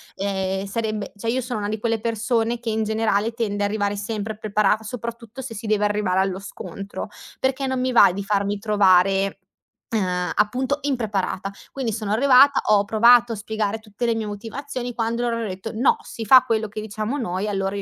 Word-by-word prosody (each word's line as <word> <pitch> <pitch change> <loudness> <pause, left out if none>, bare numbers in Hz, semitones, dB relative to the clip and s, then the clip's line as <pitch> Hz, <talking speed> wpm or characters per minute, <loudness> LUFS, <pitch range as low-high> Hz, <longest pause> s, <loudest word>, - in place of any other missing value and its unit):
ehm, 190 0 -2
sarebbe 215 0 -3
cioè 225 +3 -4
io 255 +3 +1
sono 245 -3 -4
una 205 0 -3
di 215 - -2
quelle 230 +1 0
persone 230 +1 0
che 235 -1 -3
in 220 0 0
generale 220 0 0
tende 210 -3 -2
a 205 - +2
arrivare 205 -1 -1
sempre 210 +1 -4
a - - -14
preparata, 215 0 +1
soprattutto 235 +1 -7
se 245 -2 -6
si 220 +1 -7
deve 210 -1 +2
arrivare 205 -3 +1
allo 190 -1 -1
scontro, 200 +1 -7 0.3
perché 265 +1 0
non 260 -1 -1
mi 255 0 0
va 235 -6 +7
di 200 +2 -4
farmi 200 0 0
trovare, 195 -2 +3 0.6
uhm, 180 -3 0
appunto 255 +7 0
impreparata. 210 -7 -2 0.2
Quindi 260 -4 -2
sono 210 -1 -2
arrivata, 270 +3 +6
ho 200 -1 +5
provato 235 +3 +5
a - - -3
spiegare 215 0 -2
tutte 220 +2 -5
le 230 - +2
mie 225 -1 -2
motivazioni, 240 +4 -6
quando 230 +1 -1
loro 240 -1 0
hanno 230 -1 -3
detto: 190 +3 -6
"No, 275 - +3
si 230 - -7
fa 255 +4 +8
quello 225 -3 0
che 215 +1 -6
diciamo 215 +4 -3
noi", 190 -3 -2
allora 195 -1 -1
io 200 - -3
215 Hz, 200 wpm, -23 LUFS, 200-235 Hz, 0.6 s, fa